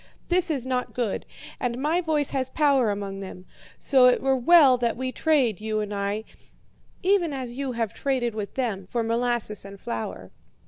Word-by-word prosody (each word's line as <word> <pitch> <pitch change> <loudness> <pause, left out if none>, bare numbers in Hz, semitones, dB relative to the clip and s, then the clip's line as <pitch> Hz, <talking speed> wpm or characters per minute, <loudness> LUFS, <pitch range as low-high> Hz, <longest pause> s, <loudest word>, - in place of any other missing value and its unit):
This 360 0 +2
is 275 -6 -1
not 255 -1 -2
good, 235 -5 -2 0.3
and 245 -1 -2
my 315 +6 +1
voice 310 -4 0
has 260 -1 -1
power 275 -6 +3
among 200 -1 -4
them; 185 -1 -9 0.3
so 260 -2 +5
it 250 - +4
were 270 0 +2
well 275 0 +6
that 235 -2 -1
we 260 0 -2
trade, 255 - +1
you 215 0 -1
and 210 -1 -3
I, 200 +2 -2 0.8
even 360 -5 +2
as 255 -3 -5
you 270 -1 -3
have 230 -2 -2
traded 255 -4 -1
with 210 -2 -5
them, 215 -8 -2
for 235 +3 -1
molasses 230 -2 -1
and 200 0 -11
flour.' 95 - -5
245 Hz, 180 wpm, -25 LUFS, 210-275 Hz, 0.8 s, well